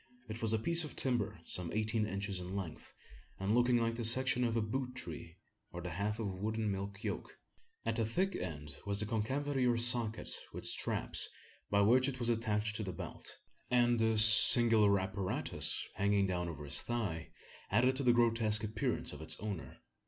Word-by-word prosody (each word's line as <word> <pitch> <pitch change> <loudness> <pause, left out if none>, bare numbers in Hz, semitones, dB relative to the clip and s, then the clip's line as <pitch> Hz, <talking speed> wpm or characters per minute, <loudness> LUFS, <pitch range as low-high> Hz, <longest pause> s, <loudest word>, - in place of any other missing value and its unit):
It 110 +1 -8
was 110 -1 +3
a 110 - +2
piece 170 +9 +5
of 155 - -8
timber 110 -7 -2
some 90 -2 -3
eighteen 110 0 -1
inches 100 -1 -4
in 90 +2 -7
length, 90 -6 -7 0.5
and 95 +2 -1
looking 120 +1 +3
like 115 0 0
the 115 0 -5
section 125 +2 +5
of 115 -1 -1
a - - +1
boot 125 +3 -4
tree, 85 -5 -8 0.3
or 90 - -7
the 90 0 -6
half 100 +5 -3
of 110 - -4
a 100 - -3
wooden 110 +2 -3
milk 100 +2 -6
yoke. 105 -3 -6 0.5
At 115 0 -1
the 115 - +1
thick 185 - -1
end 75 -5 -6
was 100 +1 +2
a - - -3
concavity 130 +5 -2
or 120 -1 +1
socket, 115 -2 0 0.2
with - - -8
straps, - - 0 0.4
by 100 0 +2
which 125 +6 +3
it 130 - -7
was 120 -2 -2
attached 110 -2 -1
to 110 - -4
the 95 - -5
belt; - - -7 0.3
and 120 -1 +2
this 110 -1 +8
singular 110 -2 +7
apparatus, 95 0 -2
hanging 100 0 +1
down 90 -2 -3
over 75 -3 -8
his 70 - +2
thigh, 105 -9 -4 0.4
added 125 +6 +2
to 140 - -1
the 125 - +4
grotesque 115 -2 +1
appearance 110 -6 -3
of 75 - -10
its 80 - -2
owner. 105 -6 -7
110 Hz, 190 wpm, -33 LUFS, 100-120 Hz, 0.5 s, this